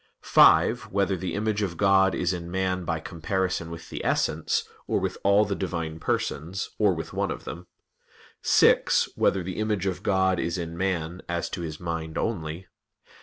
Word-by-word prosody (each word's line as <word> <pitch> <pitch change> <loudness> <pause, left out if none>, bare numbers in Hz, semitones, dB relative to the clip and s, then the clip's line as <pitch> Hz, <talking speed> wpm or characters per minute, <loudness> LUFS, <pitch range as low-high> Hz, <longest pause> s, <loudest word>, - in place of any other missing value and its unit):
(5) - - +5
Whether 100 -1 +1
the 95 0 -4
image 105 0 0
of 90 -5 -2
God 95 -1 +4
is 90 +1 0
in 85 -1 -5
man 95 0 -1
by 80 -1 -1
comparison 90 0 -2
with 85 0 -9
the - - -5
Essence, - - 0 0.2
or - - +1
with - - -2
all 100 +2 +5
the 100 - -2
Divine 85 -5 -3
Persons, 85 +4 -2
or 105 -4 +4
with 80 - -6
one - - -1
of - - -5
them? 85 +1 -8 0.7
(6) - - +4
Whether 95 - +1
the 90 +1 -5
image 105 -3 -1
of 95 -2 -2
God 95 -2 +2
is 85 +1 -1
in 85 -1 -5
man, 90 -1 -2
as 85 0 -2
to 90 - -4
his 80 -2 -5
mind 80 -2 -4
only? 85 -5 -3
90 Hz, 175 wpm, -26 LUFS, 85-95 Hz, 0.7 s, 5